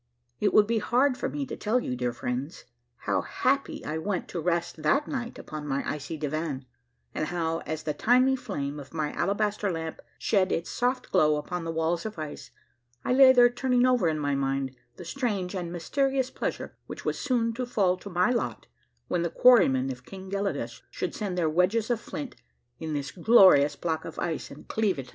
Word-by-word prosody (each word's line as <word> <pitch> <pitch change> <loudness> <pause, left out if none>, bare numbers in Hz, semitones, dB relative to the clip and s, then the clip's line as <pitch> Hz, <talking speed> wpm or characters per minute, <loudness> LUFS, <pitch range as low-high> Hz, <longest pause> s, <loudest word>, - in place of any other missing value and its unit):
It 205 - +2
would 210 - +6
be 225 +1 +1
hard 255 +5 +2
for - - -3
me 285 -1 -3
to - - -6
tell 220 +4 +1
you, 125 - -3
dear 125 0 -1
friends, 125 +6 -4 0.4
how 100 -2 +1
happy 275 +2 -1
I 155 +1 -2
went 190 +2 -2
to 170 - -4
rest 170 -1 -1
that 275 - +2
night 250 -4 -4
upon 150 -1 -7
my 140 0 -1
icy 150 +2 -4
divan, 150 -2 -3 0.5
and 155 - -2
how 165 -1 -1
as 155 +1 -3
the 150 -1 -1
tiny 250 - +4
flame 150 - -4
of 140 +3 -11
my 155 -2 -1
alabaster 205 +4 0
lamp 160 -1 -5 0.2
shed 190 -3 +2
its 170 - -2
soft 250 +2 -1
glow 155 -5 +4
upon 165 +3 -4
the 165 - -2
walls 165 +1 0
of 215 - -9
ice, 155 -5 -7 0.6
I - - +2
lay 260 0 +8
there 245 -1 +7
turning 250 0 +2
over 250 -8 +3
in 155 - -1
my 145 -1 -1
mind 135 -1 -1 0.2
the 175 - -10
strange 205 -4 -2
and 175 -3 -4
mysterious 265 - 0
pleasure - - -4
which - - -8
was - - -1
soon 235 -4 +1
to 250 +1 -3
fall 195 -6 +2
to 200 - -9
my 180 +5 +2
lot 240 - -2 0.4
when 175 - 0
the 170 - 0
quarry 250 +7 +6
men 130 0 0
of 125 0 -9
King 190 +4 -10
Gelidus 200 0 -2
should - - -4
set 200 -4 -3
their 175 -3 +1
wedges 185 +8 +2
of 235 -1 0
flint 285 -3 -6 0.4
in 160 -1 -3
this 140 -1 -3
glorious 185 -7 +6
block 160 -2 -2
of - - -8
ice 165 -3 -3
and 145 - -12
cleave 210 -6 0
it - - -2
asunder. 125 - -16
180 Hz, 205 wpm, -27 LUFS, 155-235 Hz, 0.6 s, lay